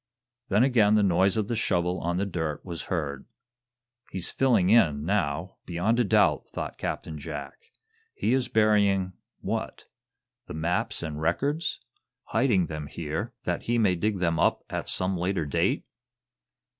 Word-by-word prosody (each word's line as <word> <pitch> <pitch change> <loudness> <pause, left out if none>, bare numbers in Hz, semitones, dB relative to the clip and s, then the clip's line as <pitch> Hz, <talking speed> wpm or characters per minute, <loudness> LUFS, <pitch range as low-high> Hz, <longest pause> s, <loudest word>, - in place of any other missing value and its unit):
Then 105 +4 +4
again 110 -6 +4
the 105 - +4
noise 95 +2 +3
of 105 -2 0
the 120 - -1
shovel 90 -5 0
on 85 +1 -1
the 100 - 0
dirt 80 -6 -3
was 85 -3 -6
heard. 75 -6 -3 0.8
"He's 95 -2 -5
filling 115 -8 +3
in, 80 -11 +4
now, 90 -2 -1
beyond 90 +7 +1
a - - +5
doubt," 100 - +3
thought - - -5
Captain 80 -1 -4
Jack. 70 -2 -8 0.5
"He 110 +5 +1
is 130 -1 +1
burying 100 -4 +3 0.3
what? - - -4 0.6
The - - -6
maps 85 +2 -1
and 75 -2 -4
records? 140 - 0 0.5
Hiding 110 -5 +3
them 75 -2 -6
here 75 0 -4
that - - -2
he 120 +1 +1
may 105 -5 +3
dig 100 +4 0
them 85 -3 0
up - - +2
at - - -3
some 95 0 0
later 90 -1 -1
date?" 70 - 0
90 Hz, 155 wpm, -27 LUFS, 80-105 Hz, 0.8 s, a